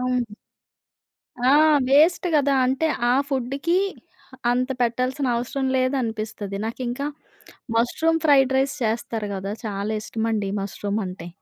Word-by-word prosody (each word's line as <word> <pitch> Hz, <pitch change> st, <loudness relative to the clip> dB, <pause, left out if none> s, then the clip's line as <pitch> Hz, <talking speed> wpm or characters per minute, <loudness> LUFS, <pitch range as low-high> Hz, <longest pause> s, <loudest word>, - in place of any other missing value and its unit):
అవును. 250 Hz, -4 st, -1 dB, 1.2 s
ఆ! -, -, +6 dB, 0.4 s
వేస్ట్ 310 Hz, +7 st, +4 dB
గదా! 285 Hz, -2 st, +3 dB
అంటే 270 Hz, +5 st, +1 dB, 0.2 s
ఆ -, -, +4 dB, 0.2 s
ఫుడ్‌కి 275 Hz, +7 st, 0 dB, 0.7 s
అంత 250 Hz, +1 st, +1 dB
పెట్టాల్సినవసరం 255 Hz, +1 st, -1 dB
లేదనిపిస్తది. 225 Hz, -6 st, -2 dB
నాకింక 245 Hz, +2 st, -4 dB, 0.8 s
మష్రూమ్ 320 Hz, +8 st, +2 dB
ఫ్రైడ్ 270 Hz, -3 st, +5 dB
రైస్ 275 Hz, +2 st, 0 dB
చేస్తారు 220 Hz, -1 st, -2 dB
గదా! 195 Hz, +1 st, -4 dB
చాలా 205 Hz, +1 st, -3 dB
ఇష్టమండి 220 Hz, -2 st, -2 dB
మష్రూమ్ 205 Hz, +1 st, -3 dB
అంటే. 180 Hz, -2 st, -7 dB
245 Hz, 105 wpm, -23 LUFS, 215-270 Hz, 1.2 s, ఆ